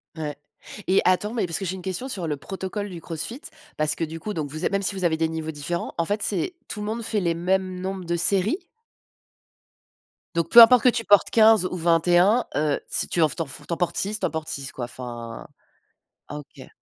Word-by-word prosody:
Ouais 150 -3 -4 0.5
et 190 - +4
attends 185 +4 +2
mais 235 - 0
parce 165 -2 -1
que - - -5
j'ai 185 +1 -2
une 185 - -8
question 190 +8 -4
sur 185 -9 -3
le 150 - -1
protocole 190 +6 -5
du 175 -3 -8
CrossFit, 165 - -5 0.4
parce 155 0 +1
que - - -3
du 165 +1 -5
coup 210 +6 -5
donc 150 -5 -3
vous 155 +4 -4
êtes - - +1
même 200 0 0
si 195 0 0
vous 185 -2 -2
avez 165 -2 +2
des 160 0 0
niveaux 160 -1 -4
différents, 160 +3 -4
en 170 - +1
fait 205 +4 -1
c'est 355 - -1
tout 210 - -5
le 210 - -4
monde 230 +2 -3
fait 220 -1 0
les 170 -2 0
mêmes 185 +1 -1
nombres 190 0 -4
de 170 0 -1
séries? 205 - +1 1.7
Donc 165 -1 0
peu 235 - +11
importe 245 0 +8
que 250 - +7
tu 230 -2 -2
portes 205 -1 +5
15 220 -3 +5
ou 185 - -3
21 175 +6 +3
heu, 150 -1 +1
si - - -1
tu 170 - 0
en 160 - +6
f - - -4
tu - - -3
en - - -1
four 135 - -7
tu 170 - -2
en - - -3
portes 175 0 -1
6, 210 +2 0
tu - - -1
en - - 0
portes 160 -1 -4
6, 135 -1 -4
quoi. 120 - -5
Enfin 120 -2 -8 0.8
ah 145 - -6
OK. 140 -2 -13
180 Hz, 245 wpm, -24 LUFS, 160-205 Hz, 1.7 s, peu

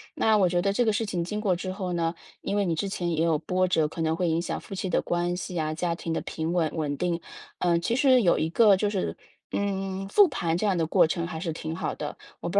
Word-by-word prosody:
那 220 -1 +3
我 190 -3 +4
觉 175 0 +1
得 195 +2 +1
这 245 - +2
个 220 - +3
事 225 +2 -1
情 180 -4 -2
经 210 +5 -3
过 200 -4 +1
之 185 +1 -4
后 185 -2 -4
呢， 165 -1 0 0.3
因 200 - -2
为 200 - +2
你 170 -3 0
之 195 +5 -2
前 175 -2 -2
也 165 -1 +1
有 165 -2 +2
波 185 +3 +1
折， 160 -4 +2
可 165 - -6
能 160 0 +1
会 175 +1 0
影 165 0 +1
响 - - -3
夫 195 - -9
妻 190 0 -3
的 - - +2
关 175 0 -1
系 180 -1 -5
啊、 155 0 -1
家 170 +1 -1
庭 165 - -5
的 160 - 0
平 160 +1 -3
稳 170 -3 +1
稳 145 -3 -2
定。 175 0 -1 0.4
呃， 170 -1 +2
其 230 +7 0
实 260 -1 +5
有 180 -6 +3
一 160 - 0
个 205 +3 +6
就 205 +2 0
是， 200 -3 -2 0.4
嗯， 195 -1 -2
复 405 - +6
盘 170 - -1
这 210 - 0
样 190 -3 +2
的 165 - +1
过 160 - +4
程 170 +1 -2
还 160 -2 -5
是 165 -1 -3
挺 160 0 -5
好 - - -3
的， 150 - -5 0.2
我 - - -3
不 - - -6
175 Hz, 300 characters per minute, -26 LUFS, 165-195 Hz, 0.4 s, 个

